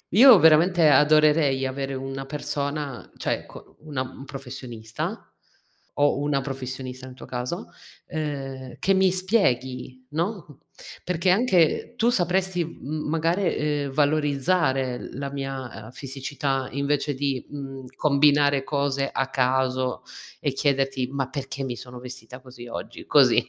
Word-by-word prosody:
Io, 245 Hz, +1 st, +10 dB
veramente, 165 Hz, 0 st, +6 dB
adorerei 150 Hz, -1 st, +4 dB
avere 135 Hz, +1 st, -3 dB
una 135 Hz, 0 st, -5 dB
persona, 145 Hz, -1 st, -4 dB
cioè -, -, -2 dB
co -, -, -14 dB
una 150 Hz, -4 st, -4 dB
un 130 Hz, +1 st, -10 dB
professionista 125 Hz, -4 st, -6 dB, 0.7 s
o 145 Hz, -1 st, +3 dB
una 145 Hz, -1 st, +1 dB
professionista, 130 Hz, -1 st, -6 dB
in 130 Hz, -, -11 dB
tuo -, -, -11 dB
caso, 125 Hz, +8 st, -4 dB, 0.4 s
uhm, 135 Hz, -5 st, -4 dB
che 195 Hz, -, +3 dB
mi 190 Hz, 0 st, +4 dB
spieghi, 130 Hz, -, 0 dB
no, 165 Hz, -, -4 dB, 0.4 s
perché 180 Hz, +1 st, +1 dB
anche 190 Hz, 0 st, +2 dB
tu 235 Hz, 0 st, +3 dB
sapresti 185 Hz, -2 st, +1 dB
m 155 Hz, -1 st, -5 dB
magari, 165 Hz, +4 st, +1 dB
ehm, 150 Hz, -2 st, -1 dB
valorizzare 145 Hz, -2 st, +1 dB, 0.2 s
la 140 Hz, +1 st, -4 dB
mia, 135 Hz, -6 st, -5 dB
uhm, 110 Hz, -, -11 dB
fisicità, 135 Hz, 0 st, -3 dB
invece 140 Hz, +1 st, 0 dB
di, 135 Hz, -1 st, -1 dB
mhmm, 135 Hz, -2 st, -7 dB
combinare 145 Hz, -1 st, +4 dB
cose 140 Hz, -1 st, 0 dB
a 135 Hz, -, 0 dB
caso 130 Hz, -1 st, 0 dB, 0.4 s
e 145 Hz, -, 0 dB
chiederti: 135 Hz, -2 st, +1 dB
"Ma 135 Hz, -2 st, -1 dB
perché 135 Hz, 0 st, -5 dB
mi 125 Hz, -2 st, -3 dB
sono 125 Hz, +1 st, -10 dB
vestita 125 Hz, 0 st, -10 dB
così 125 Hz, -2 st, -12 dB
oggi?" 115 Hz, -, -7 dB
Così. -, -, +5 dB
140 Hz, 130 wpm, -25 LUFS, 130-155 Hz, 0.7 s, Io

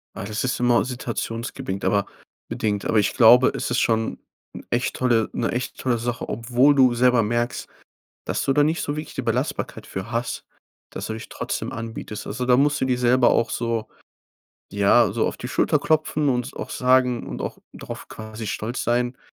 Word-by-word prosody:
Ah, -, -, -5 dB
das 110 Hz, +4 st, -3 dB
ist 125 Hz, -, -1 dB
immer 120 Hz, 0 st, +3 dB
situationsbedingt, 115 Hz, -5 st, -4 dB
aber 100 Hz, -1 st, +2 dB, 0.4 s
bedingt. 105 Hz, -2 st, -2 dB
Aber 110 Hz, -, +3 dB
ich 100 Hz, -, +1 dB
glaube, 125 Hz, +1 st, +7 dB
es -, -, -3 dB
ist 120 Hz, -, +2 dB
schon 115 Hz, -1 st, 0 dB, 0.3 s
'n -, -, -9 dB
echt 120 Hz, +1 st, -1 dB
tolle 120 Hz, -3 st, +2 dB
'ne 115 Hz, -, -1 dB
echt 125 Hz, +1 st, -3 dB
tolle 125 Hz, -2 st, 0 dB
Sache, 120 Hz, +1 st, -4 dB
obwohl 125 Hz, +5 st, +3 dB
du 130 Hz, -3 st, +5 dB
selber 125 Hz, -1 st, +4 dB
merkst, 120 Hz, +3 st, -1 dB, 0.6 s
dass -, -, -2 dB
du 135 Hz, -, +2 dB
da 145 Hz, -, +4 dB
nicht 160 Hz, +3 st, +1 dB
so 145 Hz, -, -2 dB
wirklich 155 Hz, -, -6 dB
die 135 Hz, -, -2 dB
Belastbarkeit 125 Hz, +4 st, -2 dB
für 95 Hz, +5 st, -6 dB
hast, 115 Hz, 0 st, -2 dB, 0.5 s
dass -, -, -6 dB
du 110 Hz, -, -3 dB
dich 110 Hz, -, -8 dB
trotzdem -, -, -4 dB
anbietest. 115 Hz, -2 st, -6 dB
Also, 125 Hz, +5 st, -3 dB
da 125 Hz, -1 st, +5 dB
musst 145 Hz, +2 st, +2 dB
du -, -, +2 dB
dir 125 Hz, -1 st, 0 dB
selber 125 Hz, 0 st, +4 dB
auch 115 Hz, -, +2 dB
so 115 Hz, -2 st, -2 dB, 0.8 s
ja, 100 Hz, +2 st, +4 dB
so -, -, 0 dB
auf -, -, -5 dB
die -, -, -6 dB
Schulter -, -, +2 dB
klopfen 155 Hz, -2 st, +1 dB
und 125 Hz, 0 st, 0 dB
s 140 Hz, -, -10 dB
auch -, -, -6 dB
sagen 125 Hz, -1 st, +2 dB
und -, -, -5 dB
auch -, -, -5 dB, 0.2 s
drauf, -, -, -8 dB
quasi, 110 Hz, 0 st, -8 dB
stolz 115 Hz, +5 st, -3 dB
sein, 120 Hz, +1 st, 0 dB
120 Hz, 195 wpm, -23 LUFS, 115-125 Hz, 0.8 s, glaube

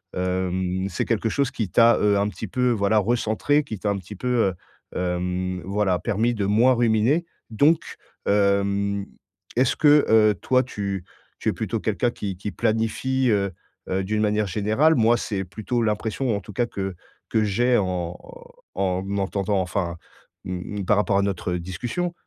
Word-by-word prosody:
hem, 90 Hz, 0 st, -1 dB
c'est 85 Hz, -, -2 dB
quelque 115 Hz, -1 st, 0 dB
chose 140 Hz, +3 st, 0 dB
qui 110 Hz, -7 st, -3 dB
t'a, 115 Hz, +6 st, +5 dB
heu, 105 Hz, -1 st, +3 dB
un 100 Hz, +1 st, +1 dB
petit 110 Hz, -, -7 dB
peu 125 Hz, +6 st, +1 dB
voilà 105 Hz, -1 st, +2 dB
recentré, 115 Hz, +6 st, +1 dB
qui 115 Hz, -7 st, -6 dB
t'a 105 Hz, -, -2 dB
un 100 Hz, -, 0 dB
petit 95 Hz, +2 st, -9 dB
peu, 125 Hz, -, -5 dB
heu, 115 Hz, -6 st, +2 dB, 0.4 s
hem, 90 Hz, 0 st, -2 dB
voilà, 95 Hz, -2 st, +1 dB
permis 115 Hz, +1 st, 0 dB
de 105 Hz, -4 st, -1 dB
moins 115 Hz, +6 st, +4 dB
ruminer. 120 Hz, +7 st, +2 dB, 0.2 s
Donc 145 Hz, +9 st, +3 dB, 0.4 s
hem, 100 Hz, 0 st, +1 dB, 0.5 s
est-ce 125 Hz, 0 st, +3 dB
que, 150 Hz, -1 st, +5 dB
heu, 110 Hz, -1 st, +5 dB
toi 130 Hz, +3 st, +2 dB
tu 100 Hz, -6 st, -4 dB, 0.4 s
tu -, -, -4 dB
es -, -, 0 dB
plutôt -, -, -3 dB
quelqu'un 120 Hz, -, 0 dB
qui 100 Hz, -5 st, -5 dB
qui 100 Hz, +2 st, -5 dB
planifie, 115 Hz, +4 st, 0 dB
heu 100 Hz, -3 st, +1 dB, 0.4 s
heu, 95 Hz, +1 st, 0 dB
d'une 105 Hz, +3 st, -1 dB
manière 105 Hz, 0 st, +1 dB
générale? 110 Hz, -, +2 dB
Moi, 115 Hz, 0 st, +4 dB
c'est 95 Hz, -5 st, -3 dB
plutôt 110 Hz, +7 st, -3 dB
l'impression 110 Hz, +2 st, -1 dB
en 100 Hz, -, -3 dB
tout 105 Hz, -, -11 dB
cas 120 Hz, -, +1 dB
que 95 Hz, -5 st, -4 dB, 0.3 s
que 110 Hz, -, +2 dB
j'ai 120 Hz, +5 st, +2 dB
en 90 Hz, -3 st, -2 dB, 0.6 s
en 95 Hz, -1 st, 0 dB
entendant 100 Hz, 0 st, 0 dB
enfin, 90 Hz, -2 st, -2 dB, 0.5 s
mmh 95 Hz, +2 st, -5 dB
par 105 Hz, -, +3 dB
rapport 105 Hz, -1 st, +2 dB
à -, -, +3 dB
notre, 100 Hz, -2 st, -2 dB
heu, 90 Hz, -, -1 dB
discussion. 120 Hz, -, -3 dB
105 Hz, 170 wpm, -24 LUFS, 95-120 Hz, 0.6 s, t'a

